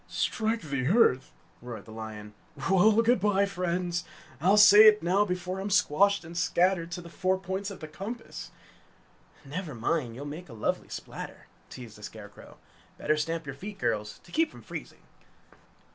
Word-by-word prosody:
"Strike 225 0 -1
the 140 -4 -2
earth!" 155 - +3 0.3
roared 120 -2 -8
the 110 - -12
lion. 110 -1 -8 0.4
"Well, 215 +4 +5
good 240 -1 +3
bye, 200 0 +2
friends! 180 -2 -2 0.4
I'll 190 +5 +4
say 210 +1 +9
it 215 -2 +5
now 190 +4 +3
before 180 0 -3
I'm 195 +2 -3
squashed 200 0 +3
and 165 +1 -10
scattered 175 0 +1
to 175 - -5
the 170 - -11
four 185 +2 0
points 190 +2 -4
of 200 - -10
the 155 - -6
compass!" 210 +9 -7 1.0
"Never 150 0 -5
mind, 120 0 -1
you'll 140 +4 -7
make 155 +3 -8
a - - -10
lovely 110 - -2
splatter!" - - -8 0.2
teased 115 -4 -10
the - - -14
Scarecrow. - - -11 0.4
"Better 155 - +1
stamp 165 +2 -2
your 135 - -5
feet, 200 +9 -8
girls, 105 - -2
to - - -17
keep 325 0 +2
from - - -14
freezing!" - - -9
180 Hz, 170 wpm, -28 LUFS, 145-200 Hz, 1.0 s, say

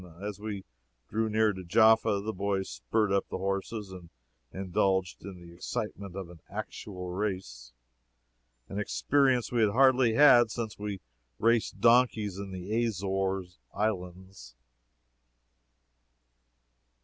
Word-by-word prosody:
As 105 0 -6
we 105 -2 -5 0.5
drew 110 0 0
near 110 0 +2
to 95 -1 -8
Jaffa, 110 +2 +4
the 110 +2 -4
boys 95 0 -1
spurred 110 -3 -1
up 100 0 0
the - - -3
horses 100 +2 -3
and 90 -3 -11 0.4
indulged 95 -1 -1
in 95 -1 -9
the 85 -1 -13
excitement 95 +2 -5
of 95 -2 -5
an 85 - -14
actual 95 -3 -6
race 90 - -4 1.0
an 100 - -5
experience 130 +3 +1
we 120 -2 +1
had 110 - +4
hardly 130 0 +4
had 120 -5 +7
since 110 -1 -5
we 100 -3 -5 0.4
raced 115 0 +2
on - - -18
donkeys 115 -5 +3
in 100 -1 -6
the 100 +6 -2
Azores 95 - -2 0.2
islands. 95 - -4
100 Hz, 125 wpm, -29 LUFS, 95-110 Hz, 1.0 s, had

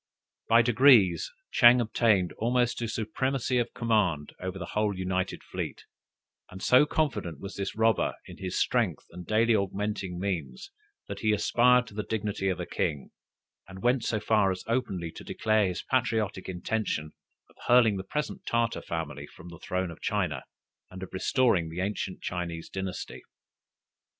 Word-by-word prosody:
By 115 +1 +6
degrees, 120 - +5 0.2
Ching 120 +1 +7
obtained 110 -5 +2
almost 120 +1 +1
a 115 - -1
supremacy 125 +4 -1
of 120 - -1
command 105 -11 0
over 95 +1 -5
the 95 - -5
whole 105 -2 0
united 95 0 -2
fleet; - - -5 0.7
and 95 - -10
so 130 +8 +5
confident 135 - -1
was 100 0 -7
this 100 -1 -4
robber 110 0 +2
in - - -11
his 95 -1 -3
strength - - 0
and 90 -1 -10
daily 115 +1 +3
augmenting 100 -2 -2
means, 85 -10 -4 0.4
that 100 0 -6
he 110 +1 +2
aspired 125 +4 +4
to - - -13
the 105 - -2
dignity 105 -3 -2
of 90 - -2
a - - -3
king, 70 -4 -2 0.6
and 95 0 -11
went 125 0 +2
so 110 - 0
far 105 -2 +2
as 95 -1 -3
openly 100 -9 -2
to - - -11
declare 110 -2 +1
his 90 - -4
patriotic 105 -4 -1
intention 90 -4 -2 0.4
of - - -25
hurling 120 -4 +5
the 95 - -4
present 150 +10 -4
Tartar 115 0 0
family 75 -3 -5
from 90 -1 -13
the 85 -2 -11
throne 90 -1 -2
of 80 - -12
China, - - -1 0.5
and 95 +1 -9
of 95 - -9
restoring 95 -4 +2
the 85 +2 -6
ancient 95 -1 -3
Chinese 85 -2 -4
dynasty. 95 -1 -5
100 Hz, 160 wpm, -28 LUFS, 90-115 Hz, 0.7 s, Ching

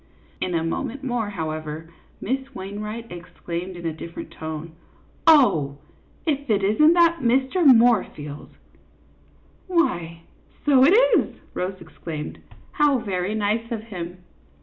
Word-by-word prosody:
In 180 -2 -1
a 165 - 0
moment 260 - -3
more, 240 -5 -1
however, 155 -3 -5 0.3
Miss 265 +4 -3
Wainwright 210 +4 -6
exclaimed, 175 +1 -6
in 170 - -8
a 165 - -1
different 165 +1 -8
tone, 160 +1 -6 0.3
" - - -33
Oh, 160 - +5 0.5
if 285 -3 -1
it 205 -2 +2
is 210 +7 +2
n't 315 +3 +7
that 335 -1 +4
Mr. 265 +8 +2
Moorfield! 225 - +3 0.5
" - - -33
" - - -33
Why, 170 - 0 0.4
so 270 -3 +6
it 345 - +6 0.3
is," - - -4 0.2
Rose 185 +1 -3
exclaimed. 155 -3 -7 0.2
" - - -28
How 295 -2 +5
very 195 -2 -2
nice 220 +3 -1
of 220 -2 -3
him! 180 -4 -7
205 Hz, 145 wpm, -23 LUFS, 170-260 Hz, 0.5 s, n't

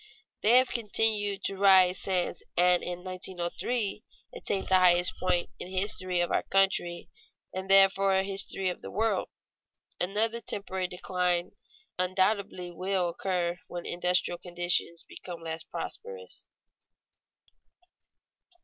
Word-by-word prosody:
They 230 +4 +6
have 255 0 +4
continued 210 -3 0
to 195 - -2
rise 190 -2 +6
since 180 -3 -1 0.2
and 180 0 +5
in 180 0 -5
1903 185 +4 -3 0.3
attained 195 -2 -2
the 185 0 +5
highest 180 0 +4
point 175 -1 0
in - - -5
the 185 0 -2
history 185 -3 -1
of 175 - -1
our - - +2
country 190 -3 +1 0.5
and 190 +1 -5
therefore 195 0 +5
in 190 0 +2
the 200 - -4
history 195 -1 -1
of 180 - -6
the - - -8
world. 220 +3 0 0.7
Another 220 +5 +1
temporary 190 -4 -3
decline 180 -1 -1 0.5
undoubtedly 185 -1 0
will 185 0 -1
occur 175 0 -2
when 175 -1 -6
industrial 180 0 0
conditions 175 -1 -1
become 170 -2 -9
less 160 0 -4
prosperous. 470 - -7
185 Hz, 125 wpm, -29 LUFS, 175-195 Hz, 0.7 s, They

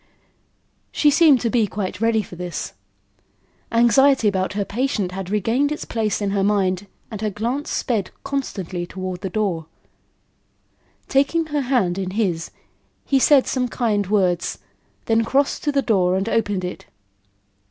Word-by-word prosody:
She 295 - +3
seemed 295 -4 +5
to 230 - 0
be 230 -4 +2
quite 190 0 -4
ready 225 -1 +2
for 180 - -11
this. 175 -1 -5 1.0
Anxiety 240 +1 +4
about 190 -1 0
her 200 0 -1
patient 210 -4 -1
had 190 0 -6
regained 225 +8 +1
its 300 - -4
place 215 -2 -1
in 200 - 0
her 200 -1 +1
mind 195 -1 +1 0.2
and 215 -2 -6
her 215 - 0
glance 235 +8 -3
sped 215 -6 -1
constantly 195 -11 -4
toward 185 -1 -5
the 195 - -3
door. 180 -6 -2 1.4
Taking 280 +5 +2
her 295 -2 -1
hand 240 -9 +1
in 190 -1 -2
his, 175 -7 0 0.6
he 275 - +2
said 275 0 +5
some 255 -2 -1
kind 215 -5 0
words, 185 -4 +1 0.5
then 225 0 +2
crossed 275 +5 0
to 295 - +2
the 280 -1 +1
door 185 -5 +2
and 195 +3 -1
opened 205 -5 0
it. 180 - -7
210 Hz, 150 wpm, -21 LUFS, 190-255 Hz, 1.4 s, seemed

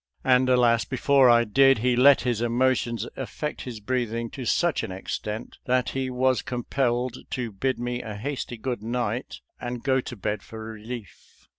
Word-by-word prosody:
And 130 0 +4
alas, 120 -2 +4
before 135 0 +4
I 120 0 +6
did, 135 +4 +5
he 125 +3 +1
let 135 +3 +6
his 120 -3 -1
emotions 120 -1 +1
affect 150 +3 -5
his 120 -4 -6
breathing 115 0 -2
to 130 - -6
such 170 +7 +2
an 110 - -5
extent 105 +4 -5
that 125 0 +1
he 130 -1 -2
was 130 0 +1
com 125 -4 -4
pelled 125 -1 -1
to 125 -3 -3
bid 130 +7 -1
me 120 0 -2
a 110 -2 -6
hasty 125 +1 -4
good 120 -1 -3
night 120 +1 -3 0.2
and 120 -1 -5
go 130 -1 +2
to 125 - -7
bed 105 0 -3
for 110 0 -9
relief. 110 -1 -10
125 Hz, 175 wpm, -25 LUFS, 115-130 Hz, 0.2 s, I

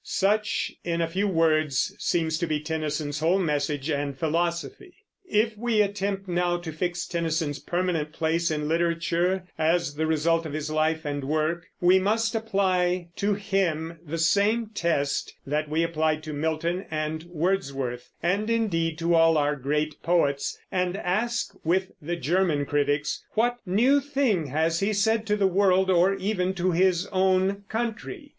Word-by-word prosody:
Such, 210 +3 0
in 170 -1 -1
a 165 - +1
few 190 +5 -1
words, 155 -6 +2
seems 160 -2 0
to 170 - -1
be 155 -1 0
Tennyson's 150 -1 -3
whole 165 +5 +3
message 145 -5 -1
and 140 -2 -2
philosophy. 170 - -2 0.3
If 215 +1 +2
we 220 -1 +2
attempt 200 -1 -3
now 175 0 +1
to 175 -2 -6
fix 175 +2 -2
Tennyson's 160 -3 -2
permanent 175 -4 -1
place 165 +2 0
in 150 -1 -2
literature, 170 +2 +1 0.2
as 165 -1 +1
the 155 +2 -1
result 165 +1 +1
of 145 - -7
his 155 0 -3
life 155 +1 0
and 145 -1 -3
work, 155 +3 -1
we 180 +2 +5
must 220 +4 +1
apply 185 -5 0
to 205 0 +1
him 170 -5 -1
the 165 0 -4
same 205 +7 +2
test 145 -7 -1
that 150 +2 -1
we 160 +2 +1
applied 155 -2 0
to 155 -1 -6
Milton 160 +5 -2
and 155 0 -2
Wordsworth, 145 -8 -2
and, 200 +6 +1
indeed, 165 -9 0
to 170 +1 +1
all 165 -1 +5
our 145 0 +1
great 150 +2 -2
poets, 145 -5 +1
and 180 0 0
ask 215 +6 -1
with 185 +3 +1
the 170 +4 -3
German 165 -1 +1
critics, 145 +1 0
"What 240 +2 +1
new 245 +10 +4
thing 270 - 0
has 160 +4 0
he 200 +2 +1
said 220 +2 +1
to 210 - +2
the 205 -2 +1
world 190 0 +3
or 185 +2 +4
even 190 -1 -1
to 185 0 +1
his 180 +1 +2
own 190 +1 +1
country?" 240 - -4
170 Hz, 160 wpm, -26 LUFS, 155-195 Hz, 0.3 s, we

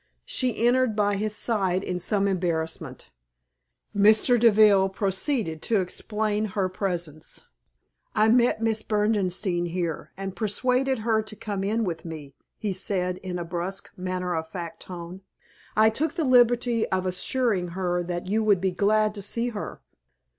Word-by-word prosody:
She 255 - 0
entered 250 -2 +3
by 205 -1 +2
his 210 +1 -2
side 190 -5 0
in 180 -2 -3
some 200 +2 +1
embarrassment. 170 -4 -3 0.8
Mr. 215 +4 +5
Deville 210 -4 +6
proceeded 190 - -1
to 220 +2 +2
explain 210 +3 -2
her 195 -2 -1
presence. 175 -5 -4 0.7
"I 215 0 +4
met 235 -1 +3
Miss 220 -1 +1
Berdenstein 200 -5 0
here, 170 -2 -3
and 195 -1 -5
persuaded 255 +5 +1
her 220 -2 +3
to 215 0 -7
come 200 -2 -4
in 220 +3 0
with 170 -5 -3
me," 155 -4 -8 0.2
he 205 -3 -2
said, 180 -1 -1
in 185 -2 -5
a 175 - -4
brusque, 180 +3 -3
matter 180 -1 -3
of 160 -1 -2
fact 170 -1 -6
tone. 180 +1 -8 0.5
"I 220 +1 +5
took 310 +7 -1
the 330 -3 0
liberty 245 -2 +3
of 185 0 0
assuring 185 +1 0
her 180 -1 0
that 175 0 -4
you 215 +4 0
would 205 -3 +4
be 190 +1 0
glad 210 +3 +2
to 205 - -6
see 230 +5 -1
her." 210 -3 -6
200 Hz, 155 wpm, -26 LUFS, 180-220 Hz, 0.8 s, Deville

